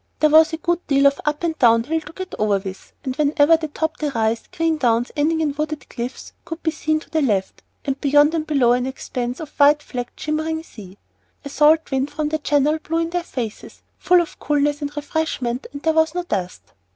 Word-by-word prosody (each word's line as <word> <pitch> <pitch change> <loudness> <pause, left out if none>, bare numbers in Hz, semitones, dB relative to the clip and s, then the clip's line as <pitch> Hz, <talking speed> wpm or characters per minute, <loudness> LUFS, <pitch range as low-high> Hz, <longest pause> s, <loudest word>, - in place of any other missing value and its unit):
There 305 -1 +4
was 320 +1 +6
a 320 - -3
good 345 +2 -2
deal 275 -1 +3
of 280 0 +3
up 300 +2 -1
and 330 -2 0
down 230 -2 +5
hill 320 +5 -1
to 300 0 -12
get 375 0 -7
over 210 -1 +2
with, 190 -1 -8
and 260 -2 -3
whenever 295 +1 +4
they 320 -1 -3
topped 315 +2 -3
a 300 - 0
rise, 225 -3 -1
green 325 -1 -1
downs 240 -3 +1
ending 320 +2 +1
in 300 -3 0
wooded 305 -1 -4
cliffs 245 +2 -6
could 330 0 -8
be 320 - +1
seen 310 0 -1
to - - -16
the 315 - +1
left, 205 -8 -1 0.2
and 275 -1 -2
beyond 290 +2 +4
and 315 -2 -2
below 270 -6 +3
an 250 +1 +1
expanse 250 -1 -4
of 315 -3 -7
white 295 +1 +5
flecked 245 -3 -6
shimmering 315 +1 -2
sea. 200 - -13 0.5
A - - -5
salt 305 +2 +3
wind 270 +1 0
from 300 0 -2
the 315 0 -1
channel 295 +1 +1
blew 325 +1 -3
in 330 0 -1
their 355 0 0
faces, 240 -10 -7 0.2
full 360 -1 +4
of 335 - -7
coolness 290 0 0
and 290 +1 -5
refreshment, 290 -5 -2
and 285 0 -9
there 320 - +2
was 320 +1 +2
no 355 - -1
dust. 190 - -5
295 Hz, 225 wpm, -21 LUFS, 260-320 Hz, 0.5 s, was